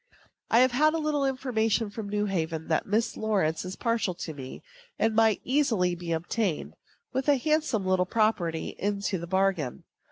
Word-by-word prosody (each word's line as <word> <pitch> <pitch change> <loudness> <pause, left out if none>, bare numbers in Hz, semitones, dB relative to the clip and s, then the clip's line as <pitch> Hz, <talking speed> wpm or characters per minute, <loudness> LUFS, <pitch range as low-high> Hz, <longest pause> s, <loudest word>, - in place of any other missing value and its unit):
I 230 - +5
have 255 0 +4
had 305 +5 +3
a - - +1
little 300 -3 0
intimation 230 -5 0
from 210 -1 -6
New 210 0 0
Haven 165 -5 -2
that 160 - +1
Miss 215 +3 0
Lawrence 195 -8 0
is 185 0 -6
partial 230 -6 0
to 165 -2 -6
me, 130 -3 -9 0.3
and 225 0 +2
might 220 -1 +3
easily 235 -10 +2
be 175 -1 -5
obtained, 170 +2 -1 0.4
with 265 +2 0
a 290 - +6
handsome 290 -7 0 0.2
property 185 -7 0
into 200 -1 -1
the 170 - -6
bargain. 190 -7 0
210 Hz, 165 wpm, -28 LUFS, 175-240 Hz, 0.4 s, a